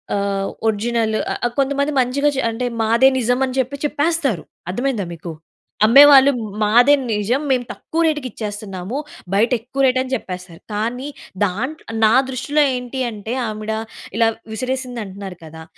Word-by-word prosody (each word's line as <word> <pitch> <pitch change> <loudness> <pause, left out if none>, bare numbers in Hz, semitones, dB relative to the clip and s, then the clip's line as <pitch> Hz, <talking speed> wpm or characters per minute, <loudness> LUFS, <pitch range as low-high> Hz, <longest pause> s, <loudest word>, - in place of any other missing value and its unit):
ఆహ్, 200 -1 -1 0.2
ఒరిజినల్ 220 +1 0 0.2
ఆహ్, - - -3
ఆహ్, 240 - -1
కొంతమంది 280 +2 +1
మంచిగా‌చే 275 +2 +1
అంటే 235 +3 -3 0.2
మాదే 230 +4 +5
నిజం 245 +1 +1
అని 260 0 -5
చెప్పి 260 +2 -1
చెప్పేస్తారు. 290 - 0 0.3
అర్థమయిందా 240 -1 -1
మీకు. 170 0 -7 0.5
అమ్మేవాళ్ళు 275 +3 +8 0.3
మాదే 245 +7 +5 0.2
నిజం. 215 +6 0
మేము 255 -2 +2
తక్కువ 330 - -3
రేట్‌కి 295 -4 0
ఇచ్చేస్తున్నాము. 205 +1 -5 0.4
బయట 220 +5 +3
ఎక్కువ 260 +4 -4
రేట్ 255 0 +3
అని 260 0 -4
చెప్పేస్తారు. 180 -6 -7
కానీ 240 +6 -2 0.4
దాంట్లో, 255 - -4 0.2
నా 215 - +5 0.2
దృష్టిలో 270 +4 0
ఏంటి 250 +1 -5
అంటే 220 +2 -6
ఆమిడ 215 0 -4 0.5
ఇలా 230 -1 +4 0.2
విసిరేసింది 255 +1 -3
అంటున్నారు 190 -2 -8
కదా! 160 0 -10
240 Hz, 140 wpm, -20 LUFS, 210-265 Hz, 0.5 s, అమ్మేవాళ్ళు